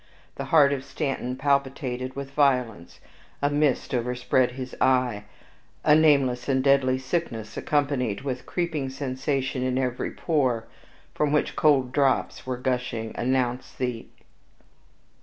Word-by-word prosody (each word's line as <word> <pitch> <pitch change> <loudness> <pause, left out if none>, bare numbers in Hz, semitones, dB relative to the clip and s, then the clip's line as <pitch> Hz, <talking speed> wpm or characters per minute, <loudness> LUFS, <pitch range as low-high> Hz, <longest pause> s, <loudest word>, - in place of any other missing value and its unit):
The 140 - -5
heart 140 0 +5
of 135 -2 -3
Stanton 135 -2 -3
palpitated 135 -2 -1
with 140 0 -6
violence, 125 - 0 0.4
a 145 0 +1
mist 145 -3 +1
overspread 125 +1 +1
his 130 0 -7
eye, 125 -5 +2 0.6
a 150 - +5
nameless 140 -5 +3
and 130 -1 +2
deadly 135 -2 +3
sickness, 130 -6 -3
accompanied 140 -7 0
with 130 -2 -3
a - - -19
creeping 160 -6 -2
sensation 130 0 -2
in 130 0 0
every 125 -2 -1
pore, 130 -8 0 0.5
from 150 -1 0
which 150 - +1
cold 135 -5 +3
drops 135 -1 0
were 130 -1 -2
gushing, 125 -3 -2
announced 125 0 -1
the. 125 -3 -3
130 Hz, 130 wpm, -25 LUFS, 125-140 Hz, 0.6 s, heart